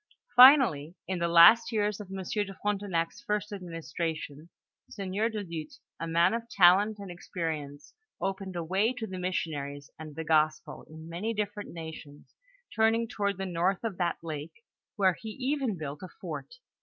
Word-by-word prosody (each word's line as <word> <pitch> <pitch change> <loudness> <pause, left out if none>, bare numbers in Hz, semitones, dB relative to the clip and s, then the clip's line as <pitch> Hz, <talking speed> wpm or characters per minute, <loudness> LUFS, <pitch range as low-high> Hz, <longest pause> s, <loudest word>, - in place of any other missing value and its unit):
Finally, 245 - +7
in 185 -2 -2
the 170 - +1
last 170 +9 +7
years 210 -2 0
of 205 -3 -9
M. 190 0 -5
de 195 +1 -3
Frontenac's 200 -1 -1
first 210 -2 -2
administration, 165 -3 -5 0.4
Sieur 200 +3 -2
du 215 -2 -4
Luth, 165 -4 -7 0.2
a 165 - -3
man 170 +3 +3
of 230 0 -4
talent 200 +3 +5
and 200 -3 -8
experience 160 -5 -5 0.3
opened 195 -1 -3
a 170 - -2
way 195 +8 +1
to 250 -3 -5
the 190 -3 -6
missionaries 145 -6 -3
and 155 -2 -9
the 160 - -4
gospel 155 -1 +1
in 160 +1 -11
many 195 +7 -3
different 205 0 -3
nations 160 -3 -10 0.4
turning 225 +1 +3
toward 200 -4 -2
the 195 - -3
north 180 +2 0
of 215 -6 -4
that 175 -1 0
lake, 155 - -7 0.3
where 190 -4 +3
he 220 - -6
even 265 -6 -1
built 150 -1 -6
a 185 - -6
foil - - -6
185 Hz, 165 wpm, -29 LUFS, 165-210 Hz, 0.4 s, Finally